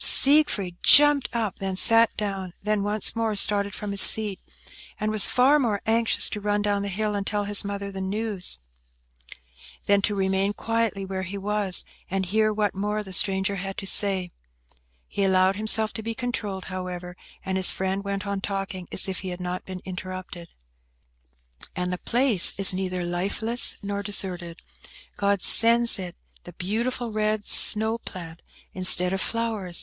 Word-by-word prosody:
Siegfried 265 - +4
jumped 290 -1 +5
up; 225 -4 -4
then 190 -1 -4
sat 230 +3 +4
down; 195 -4 -5
then 210 0 -1
once 205 +2 +1
more 225 -2 -2
started 200 0 +1
from 210 -1 -6
his 200 - +4
seat, 210 -3 +6 0.6
and 215 0 -2
was 215 -2 +3
far 270 +4 +3
more 220 -7 -1
anxious 225 +1 +3
to 210 - -6
run 205 0 -1
down 205 -1 -1
the 200 - -4
hill 210 +2 -3
and 200 -1 -4
tell 205 -1 -2
his 205 0 0
mother 200 0 -6
the 195 0 -7
news, 200 0 -2 1.3
than 200 0 +2
to 205 +1 -1
remain 195 +1 -1
quietly 225 -3 -2
where 190 0 -5
he 190 +2 -7
was, 200 -1 0 0.2
and 190 0 -2
hear 215 +3 0
what 210 -1 -2
more 210 +2 -4
the 190 -2 -11
stranger 195 +1 +1
had 195 +1 -7
to 195 - -6
tell. 195 -1 +1 0.8
He 200 - -3
allowed 190 0 +2
himself 220 +1 +1
to - - -7
be 225 +1 -6
controlled, 215 -6 -5
however, 180 -1 -7 0.3
and 190 0 -3
his 190 -1 +3
friend 190 +1 -3
went 200 0 -5
on 200 -1 -4
talking 195 -2 -5
as - - +1
if 190 -1 -3
he 190 - -6
had 180 0 -7
not 180 0 -6
been 185 -1 -9
interrupted. 185 -2 -8 1.3
"And 180 0 -3
the 180 - -5
place 240 -6 +3
is 195 -1 +6
neither 185 -1 -4
lifeless 200 +7 +1
nor 200 0 -4
deserted. 185 -4 -3 0.5
God 200 -1 0
sends 235 -1 +5
it 180 -2 -7 0.3
the 175 - -13
beautiful 230 +6 -4
red 215 -1 -2
snow 220 +2 +5
plant 170 -5 -10 0.3
instead 185 0 +4
of 195 - -2
flowers. 220 -7 0
200 Hz, 170 wpm, -23 LUFS, 190-215 Hz, 1.3 s, seat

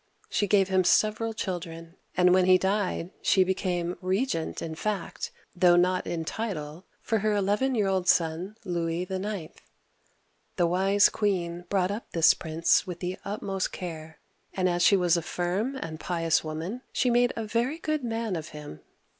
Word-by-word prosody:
She 205 - +1
gave 195 -1 +4
him 190 -1 +3
several 215 +4 +2
children, 170 -5 -5 0.2
and 180 0 +5
when 185 0 +4
he 185 0 +6
died 190 -2 -1
she 190 - +4
became 180 -2 -2
regent 185 -2 -1
in 160 -1 -5
fact, 195 +2 -3 0.3
though 175 -1 +5
not 180 +1 +2
in 165 -1 -3
title, 170 -6 -5 0.2
for 225 -2 0
her 215 +1 +1
eleven 205 +7 +1
year 210 -3 +2
old 190 -1 0
son, 170 +5 +1
Louis 170 -1 -1
IX. 190 -2 -4 1.0
The 175 - +2
wise 195 +4 +4
queen 175 -4 -1
brought 190 -1 +1
up 210 +3 -7
this 165 -1 +6
prince 165 +4 +1
with 175 -2 -6
the 180 +1 -4
utmost 195 -2 -3
care, 160 -3 -7 0.4
and 185 -1 +1
as 175 -1 0
she 200 +3 +6
was 175 -2 +3
a - - -1
firm 185 +10 -2
and 160 -11 -6
pious 165 -2 0
woman, 165 +10 -5
she 250 - +1
made 245 +1 +3
a 225 - -3
very 235 +7 -1
good 310 -3 -2
man 225 -4 -2
of 160 -1 -5
him. 145 - -9
185 Hz, 170 wpm, -27 LUFS, 170-205 Hz, 1.0 s, he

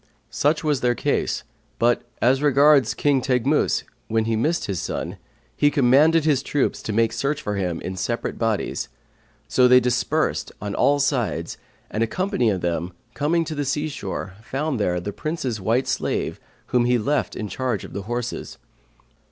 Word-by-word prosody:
Such 150 +2 +1
was 150 -4 +1
their 120 -1 +2
case; - - -1 0.3
but 120 +1 +2 0.2
as 130 +3 +4
regards 145 -1 +5
King 140 -3 +2
Teghmus, 130 +4 +1 0.2
when 110 0 +1
he 115 0 0
missed 155 +10 0
his 95 -4 -3
son, - - -4 0.4
he 145 - +4
commanded 145 +4 +4
his 145 -4 +3
troops 145 0 -1
to - - -4
make 115 +1 +2
search 140 +5 -1
for 105 - -3
him 90 -4 -2
in 95 - -5
separate 95 +6 -3
bodies; 115 -3 -1 0.6
so 125 -1 +4
they 125 0 +7
dispersed 125 -1 0
on 100 0 -4
all 145 - +3
sides 125 - 0 0.4
and 110 - -2
a 115 - +3
company 185 - 0
of 95 -4 -1
them, 85 +1 -2 0.2
coming 165 +3 +1
to 160 - -4
the 145 -1 -2
sea 150 +3 -1
shore, 100 -8 -5
found 135 +2 -2
there 90 -4 +1
the 100 +4 -5
Prince's 135 -8 -3
white 115 +7 +1
slave - - -1 0.3
whom 120 -1 +4
he 125 - +2
had 115 -3 +1
left 150 0 0
in 105 - -4
charge 120 -3 -2
of - - -11
the 100 - -4
horses. 120 0 -4
125 Hz, 175 wpm, -23 LUFS, 110-145 Hz, 0.6 s, they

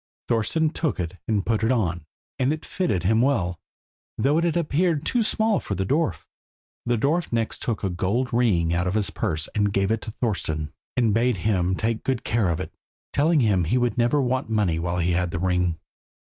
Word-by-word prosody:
Thorston 135 +8 +1
took 160 - -1
it 90 +1 -4
and 105 -4 0
put 110 -1 0
it 115 - +3
on, 85 - -1 0.3
and 130 +2 +2
it 155 0 -4
fitted 170 - -1
him 110 +5 +3
well, 95 -10 +1 0.6
though 145 +4 +2
it - - 0
had 170 0 +1
appeared 160 -1 +1
too 245 - +1
small 220 -1 +2
for 100 - -4
the 95 +1 -1
dwarf. 125 - 0 0.6
The 120 0 +2
dwarf 155 +8 0
next 115 -1 -1
took 115 -3 -2
a 95 - +1
gold 110 +9 -1
ring 95 -9 +2
out 90 +1 0
of 90 - -1
his 105 -3 +2
purse 80 -8 -2
and 105 -1 +1
gave 100 +1 +1
it 110 -1 0
to - - -7
Thorston, 80 - -2 0.2
and 115 -4 +3
bade 120 0 +2
him 95 -4 +2
take 110 +2 -1
good 130 -3 -1
care 110 -5 +1
of 85 -1 -1
it, 90 - -6 0.4
telling 155 +1 +3
him 100 -6 +3
he 85 - +1
should 120 -1 +1
never 120 +4 +2
want 130 -2 0
money 100 -7 +1
while 85 +1 -2
he 90 0 +1
had 90 0 +1
the 90 - -3
ring. 90 -1 0
110 Hz, 210 wpm, -24 LUFS, 90-130 Hz, 0.6 s, it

